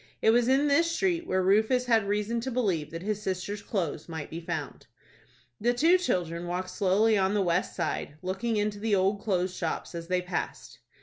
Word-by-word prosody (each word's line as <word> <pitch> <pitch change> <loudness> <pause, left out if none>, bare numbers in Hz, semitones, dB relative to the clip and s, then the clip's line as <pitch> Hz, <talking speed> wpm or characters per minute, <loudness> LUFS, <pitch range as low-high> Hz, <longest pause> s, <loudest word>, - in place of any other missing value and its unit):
It 220 - +4
was 240 +1 +3
in 270 +3 +3
this 310 +4 +3
street 340 -1 0
where 185 0 +1
Rufus 220 +6 +3
had 225 -4 +3
reason 210 +3 0
to 260 - -3
believe 195 - 0
that 165 +2 -7
his 210 0 -2
sister's 195 +1 -3
clothes 170 -7 -3
might 160 -3 -6
be 165 +2 -5
found. 160 -4 -5 0.7
The 240 +2 +1
two 335 +8 +5
children 175 - -1
walked 185 +1 -3
slowly 205 +2 +3
on 190 +2 +1
the 205 - +2
west 175 0 0
side, 155 -4 -3
looking 195 +5 -1
into 205 0 -1
the 215 -1 +1
old 195 +2 +1
clothes 185 -3 0
shops, 165 0 -3
as 170 -1 -6
they 180 0 0
passed. 180 - -5
200 Hz, 195 wpm, -28 LUFS, 180-230 Hz, 0.7 s, two